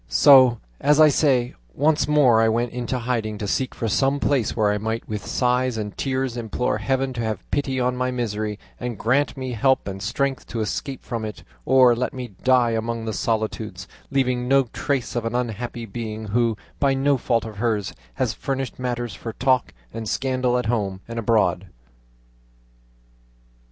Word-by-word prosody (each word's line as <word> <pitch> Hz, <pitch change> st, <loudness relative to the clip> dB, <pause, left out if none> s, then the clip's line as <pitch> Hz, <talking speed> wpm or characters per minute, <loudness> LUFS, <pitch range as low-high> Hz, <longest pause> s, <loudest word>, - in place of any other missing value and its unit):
So, 130 Hz, -, +7 dB, 0.2 s
as 150 Hz, +1 st, +3 dB
I 155 Hz, -1 st, +8 dB
say, 130 Hz, -4 st, +2 dB, 0.2 s
once 150 Hz, +2 st, +2 dB
more 135 Hz, -7 st, +5 dB
I 115 Hz, -, +4 dB
went 120 Hz, +2 st, 0 dB
into 125 Hz, +1 st, -3 dB
hiding 115 Hz, -3 st, -2 dB
to 105 Hz, -, -4 dB
seek 130 Hz, +5 st, -1 dB
for 115 Hz, -, -2 dB
some 135 Hz, +6 st, +1 dB
place 135 Hz, -6 st, +1 dB
where 105 Hz, -2 st, +3 dB
I 105 Hz, -, -1 dB
might 110 Hz, +2 st, -3 dB
with 105 Hz, -1 st, -4 dB
sighs 125 Hz, -1 st, +1 dB
and 105 Hz, -2 st, -4 dB
tears 130 Hz, -2 st, -1 dB
implore 115 Hz, -1 st, -1 dB
Heaven 130 Hz, +3 st, 0 dB
to 120 Hz, -, -3 dB
have 110 Hz, -4 st, -3 dB
pity 135 Hz, -2 st, 0 dB
on 125 Hz, 0 st, +1 dB
my 125 Hz, 0 st, -1 dB
misery, 110 Hz, -4 st, -2 dB, 0.2 s
and 120 Hz, -3 st, -4 dB
grant 135 Hz, +5 st, +1 dB
me 130 Hz, -1 st, -4 dB
help 130 Hz, +2 st, +2 dB
and 95 Hz, -1 st, -5 dB
strength 135 Hz, +5 st, -1 dB
to 115 Hz, -, -4 dB
escape 130 Hz, +5 st, -3 dB
from 115 Hz, -3 st, -4 dB
it, 110 Hz, -1 st, -6 dB, 0.2 s
or 130 Hz, -2 st, +6 dB
let 125 Hz, +3 st, -2 dB
me 125 Hz, -2 st, -5 dB
die 125 Hz, -2 st, +4 dB
among 115 Hz, 0 st, -2 dB
the 110 Hz, -, -3 dB
solitudes, 110 Hz, -4 st, -2 dB, 0.2 s
leaving 125 Hz, -2 st, 0 dB
no 135 Hz, +1 st, +5 dB
trace 135 Hz, -6 st, -2 dB
of 120 Hz, -, -1 dB
an 115 Hz, +1 st, -3 dB
unhappy 120 Hz, -1 st, -3 dB
being 110 Hz, 0 st, -6 dB
who, 115 Hz, 0 st, +1 dB, 0.2 s
by 140 Hz, -2 st, +3 dB
no 140 Hz, +1 st, +2 dB
fault 115 Hz, -2 st, 0 dB
of 110 Hz, -2 st, -8 dB
hers, 110 Hz, -3 st, -1 dB, 0.2 s
has -, -, 0 dB
furnished 135 Hz, -3 st, -4 dB
matter 120 Hz, -1 st, -2 dB
for 110 Hz, +2 st, -7 dB
talk 130 Hz, +1 st, +1 dB, 0.2 s
and 110 Hz, -2 st, -4 dB
scandal 130 Hz, -2 st, 0 dB
at 125 Hz, -, -1 dB
home 100 Hz, -5 st, -1 dB
and 115 Hz, 0 st, -4 dB
abroad." 100 Hz, -5 st, +1 dB
120 Hz, 180 wpm, -23 LUFS, 110-130 Hz, 0.2 s, I